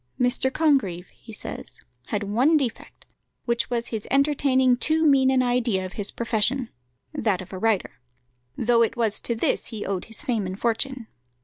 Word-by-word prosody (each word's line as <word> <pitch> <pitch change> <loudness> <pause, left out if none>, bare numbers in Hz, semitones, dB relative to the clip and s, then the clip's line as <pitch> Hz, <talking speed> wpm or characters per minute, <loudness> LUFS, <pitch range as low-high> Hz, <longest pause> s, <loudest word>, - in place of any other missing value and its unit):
"Mr. 250 +1 +2
Congreve," 265 - +1
he 230 - -15
says, 215 - -8 0.3
"had 210 -1 -2
one 250 +11 +3
defect, 255 -6 -5 0.4
which 235 -1 0
was 235 -1 -2
his 220 -3 -5
entertaining 275 -2 +3
too 315 +5 +1
mean 270 -3 +5
an 260 -1 +3
idea 240 -6 +1
of 185 - -8
his 205 -1 0
profession 235 +2 0 0.4
that 210 -5 0
of 185 +1 -9
a 185 - -5
writer 195 - 0 0.6
though 235 0 +3
it 230 - +1
was 220 -3 0
to 235 - -2
this 225 - 0
he 220 -3 -6
owed 190 -2 -3
his 225 +5 -10
fame 230 -9 -1
and 185 +2 -6
fortune. 240 +2 -1
235 Hz, 175 wpm, -24 LUFS, 210-260 Hz, 0.6 s, mean